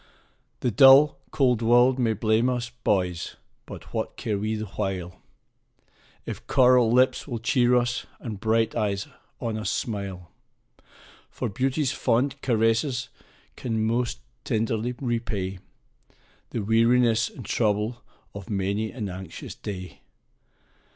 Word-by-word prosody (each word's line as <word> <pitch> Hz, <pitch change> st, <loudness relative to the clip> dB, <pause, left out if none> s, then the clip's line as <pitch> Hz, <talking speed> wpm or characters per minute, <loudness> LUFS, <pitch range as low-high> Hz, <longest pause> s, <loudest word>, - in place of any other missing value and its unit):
The 125 Hz, -, +1 dB
dull, 135 Hz, +6 st, +7 dB
cold 125 Hz, -4 st, +2 dB
world 120 Hz, +3 st, +4 dB
may 115 Hz, -3 st, +2 dB
blame 110 Hz, +3 st, +2 dB
us, 125 Hz, -1 st, -2 dB
boys! 95 Hz, -8 st, -1 dB, 0.3 s
but -, -, -10 dB
what -, -, -3 dB
care 110 Hz, -, -2 dB
we 110 Hz, +2 st, -1 dB
the 110 Hz, 0 st, -4 dB
while, 90 Hz, -2 st, -4 dB, 1.0 s
If -, -, -7 dB
coral 125 Hz, -3 st, +5 dB
lips 130 Hz, +4 st, +3 dB
will 120 Hz, -4 st, -3 dB
cheer 120 Hz, +1 st, +2 dB
us, 120 Hz, +1 st, 0 dB
and 110 Hz, -5 st, -6 dB
bright 110 Hz, +1 st, +1 dB
eyes 100 Hz, -2 st, -1 dB, 0.3 s
on 110 Hz, -2 st, -3 dB
us 110 Hz, -, -2 dB
smile? 100 Hz, -6 st, -4 dB, 1.0 s
For 125 Hz, -, -4 dB
beauty's 130 Hz, +6 st, 0 dB
fond 130 Hz, +2 st, 0 dB
caresses 120 Hz, +2 st, +1 dB, 0.5 s
can 110 Hz, -3 st, -2 dB
most 120 Hz, +1 st, -1 dB, 0.2 s
tenderly 115 Hz, -1 st, -1 dB
repay 110 Hz, -7 st, -2 dB, 0.9 s
The 115 Hz, -, -3 dB
weariness 115 Hz, +1 st, +3 dB
and 125 Hz, -, -11 dB
trouble 110 Hz, +2 st, 0 dB, 0.3 s
of 100 Hz, -2 st, -9 dB
many 100 Hz, +2 st, -1 dB
an 110 Hz, -5 st, -5 dB
anxious 95 Hz, -2 st, -8 dB
day. 90 Hz, -9 st, -8 dB
115 Hz, 125 wpm, -25 LUFS, 105-125 Hz, 1.0 s, dull